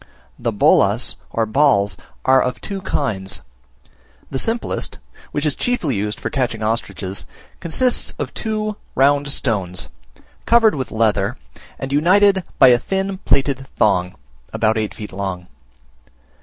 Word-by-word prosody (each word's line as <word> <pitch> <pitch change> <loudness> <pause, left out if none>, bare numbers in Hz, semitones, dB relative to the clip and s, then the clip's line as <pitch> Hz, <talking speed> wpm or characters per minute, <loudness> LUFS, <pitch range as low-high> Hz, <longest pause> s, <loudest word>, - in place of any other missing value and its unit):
The - - -1
bolas, - - +3
or 115 - 0
balls, 110 -4 +3 0.3
are 130 0 +5
of 125 0 -2
two 195 -2 -6
kinds: 100 - -3 0.9
the 135 - -2
simplest, 230 - -1 0.3
which 145 +1 -1
is 150 - +1
chiefly 245 - 0
used 105 +4 -2
for - - -4
catching 120 -5 -1
ostriches, 105 -3 -2 0.3
consists 245 +10 +1
of - - -4
two 215 -1 -3 0.2
round 140 +1 +3
stones, 95 -10 -1 0.6
covered 230 -2 +5
with 130 -3 -3
leather, 110 +1 +1 0.4
and 135 0 -5
united 190 +5 +4
by 130 - +8
a 120 -1 +5
thin 195 +3 -2
plaited 135 -1 +1
thong, 90 -3 +2 0.4
about 110 0 +1
eight 110 -2 -2
feet 105 -2 -8
long. 95 -2 -4
130 Hz, 130 wpm, -20 LUFS, 105-180 Hz, 0.9 s, by